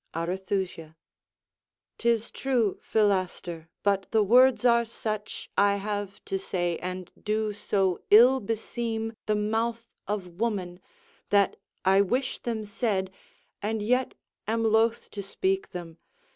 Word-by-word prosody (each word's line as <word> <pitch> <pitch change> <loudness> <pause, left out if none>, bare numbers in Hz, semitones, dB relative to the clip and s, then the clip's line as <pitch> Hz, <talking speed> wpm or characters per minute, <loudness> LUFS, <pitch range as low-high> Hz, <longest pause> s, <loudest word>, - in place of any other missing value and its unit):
Arethusa 180 -1 -3 1.0
'Tis 235 -1 +1
true, 245 -7 0
Philaster, 185 -5 0 0.2
but 200 -1 +1
the 220 -1 +3
words 250 +4 +5
are 235 -1 +5
such 215 -2 -5
I 200 0 +4
have 205 -1 -4
to 195 - -2
say, 175 -3 -2
and 185 0 -5
do 215 0 -1
so 195 -3 0
ill 245 +5 +8
beseem 225 +1 -3
The 215 - +2
mouth 225 +2 -1 0.2
of 205 -2 -2
woman, 180 -1 -3 0.5
that 200 -1 +3 0.3
I 195 +1 +6
wish 250 +7 -1
them 225 -3 -3
said, 200 -3 -1 0.5
And 215 +1 -1
yet 250 +4 +1 0.3
am 225 +1 0
loath 225 +1 +2
to 205 - -5
speak 380 - -1
them. 170 -3 -8
210 Hz, 125 wpm, -27 LUFS, 190-230 Hz, 1.0 s, ill